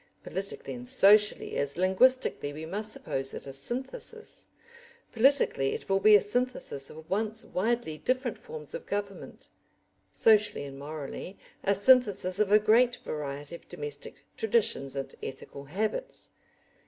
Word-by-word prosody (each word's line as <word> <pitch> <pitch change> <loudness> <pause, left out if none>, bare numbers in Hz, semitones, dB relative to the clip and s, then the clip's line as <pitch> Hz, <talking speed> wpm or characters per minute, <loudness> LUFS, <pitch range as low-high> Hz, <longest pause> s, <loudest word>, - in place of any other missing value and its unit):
Politically 450 +1 -4
and 245 0 -7
socially, 210 -4 +5
as 140 +2 -2
linguistically, 190 - +2
we 155 +2 -7
must 210 +6 -2
suppose 135 -8 -3
it - - -7
a 135 - -8
synthesis; 270 - -4 0.6
politically 240 - +2
it - - -7
will 195 0 +2
be 210 +1 +7
a 205 - +6
synthesis 210 - 0
of 160 +1 -12
once 215 +3 -1
widely 200 -6 -2
different 255 - -1
forms 150 -2 -8
of - - -7
government; 200 -1 -5 0.6
socially 210 -5 +3
and 135 -1 -9
morally, 155 +5 -7 0.3
a 200 - +2
synthesis 205 -4 +4
of 210 -2 +2
a 210 - +8
great 235 +4 +4
variety 145 0 -6
of 170 - -11
domestic 145 -1 -7
traditions 200 - 0
and 135 -1 -5
ethical 140 +1 -8
habits. 215 - -3
200 Hz, 140 wpm, -28 LUFS, 150-240 Hz, 0.6 s, a